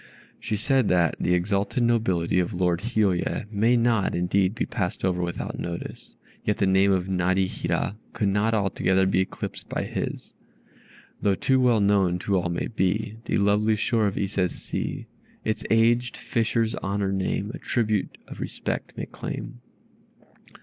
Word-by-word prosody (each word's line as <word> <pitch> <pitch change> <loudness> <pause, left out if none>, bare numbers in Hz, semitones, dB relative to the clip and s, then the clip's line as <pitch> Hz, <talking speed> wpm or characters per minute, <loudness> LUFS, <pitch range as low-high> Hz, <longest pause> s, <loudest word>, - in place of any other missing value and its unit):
She 110 - -2
said, 130 +2 +2
that 85 -3 +3
"The 90 - +2
exalted 100 +6 0
nobility 95 -8 +2
of 90 +2 -1
Lord 90 -1 +1
Hiôye 105 -4 0
may 115 +4 +3
not, 115 -4 +2
indeed, 95 +3 +1
be 115 - -1
passed 90 -1 -2
over 90 -1 +1
without 85 0 -4
notice, 85 0 -6 0.3
yet 105 - 0
the 105 - +2
name 95 +1 +4
of 95 -2 +1
Narihira 95 +2 0
could 105 - 0
not 105 +3 +2
altogether 95 -2 +2
be 95 0 +2
eclipsed 95 - -4
by - - -2
his. - - -5 0.9
Though 100 -1 +3
too 130 +7 +2
well 120 -4 +4
known 100 -3 +3
to 100 +2 -1
all 90 -1 +1
may 85 - -2
be 105 +1 -1
The - - 0
lovely 105 +2 +3
shore 110 0 +1
of 100 - -3
Ise's 95 -2 0
sea; - - -4 0.4
Its 110 - -1
aged 115 +2 +3
fisher's 115 -1 0
honored 100 0 -1
name, 95 +2 -1
A - - -7
tribute 110 -4 -1
of - - -10
respect - - -4
may - - -3
claim." - - -7
100 Hz, 155 wpm, -25 LUFS, 95-110 Hz, 0.9 s, name